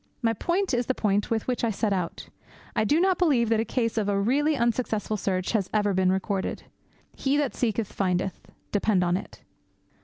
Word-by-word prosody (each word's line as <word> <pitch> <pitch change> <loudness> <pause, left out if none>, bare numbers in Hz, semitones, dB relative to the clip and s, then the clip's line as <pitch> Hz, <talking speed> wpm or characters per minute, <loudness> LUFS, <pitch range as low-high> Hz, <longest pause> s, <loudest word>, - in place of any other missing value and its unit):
My 225 -1 +3
point 355 - -1
is 245 -1 0
the 260 - +1
point 205 -1 +1
with 225 -2 -1
which 250 -1 -2
I 230 - +2
set 210 0 0
out. 180 -3 -3 0.5
I - - +2
do 295 +9 +3
not 375 0 +2
believe 270 -10 +3
that 225 -1 +3
a - - +2
case 230 -2 -1
of 205 -1 -1
a 200 -1 +1
really 285 +8 +2
unsuccessful 230 -3 0
search 185 -2 -1
has 205 -5 0
ever 205 -1 +2
been 185 0 +3
recorded. 190 0 -2 0.5
He 275 +1 +1
that 290 -3 0
seeketh, 225 -3 -1
findeth, 185 -1 -1 0.2
depend 205 -2 +2
upon 175 0 +2
it. 200 - -10
220 Hz, 195 wpm, -26 LUFS, 195-250 Hz, 0.5 s, My